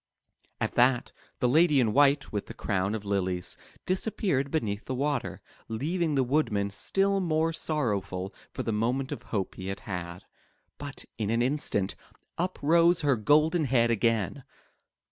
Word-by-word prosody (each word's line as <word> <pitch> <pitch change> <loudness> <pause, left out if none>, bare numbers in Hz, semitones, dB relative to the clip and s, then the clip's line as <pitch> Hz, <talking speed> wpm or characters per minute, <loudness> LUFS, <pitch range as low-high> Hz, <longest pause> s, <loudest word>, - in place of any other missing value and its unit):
At - - -1
that, 125 0 +3 0.3
the 125 - +4
lady 150 +2 +4
in 110 -4 +2
white, 140 0 +4
with 105 -2 -3
the - - -9
crown 100 +1 -1
of 105 -2 -6
lilies, 95 -3 -1 0.3
disappeared 185 -7 0
beneath 110 -9 -2
the 130 - -3
water, 140 0 -2 0.3
leaving 155 +7 -1
the 135 - +3
Woodman 115 -7 0
still 195 - +1
more 165 -2 +1
sorrowful 100 - -2 0.2
for - - -4
the 115 - -1
moment 125 +6 0
of 140 -5 -4
hope 105 -6 -3
he 95 - -7
had 95 +1 -4
had. 90 -1 -6 0.6
But 145 -1 -8
in 105 -2 -1
an 115 +1 +2
instant, 125 -8 0 0.5
up 180 +2 -1
rose 170 +3 +4
her 145 -3 +3
golden 155 +8 +3
head 120 -3 +3
again. 115 +2 0
125 Hz, 155 wpm, -28 LUFS, 105-150 Hz, 0.6 s, the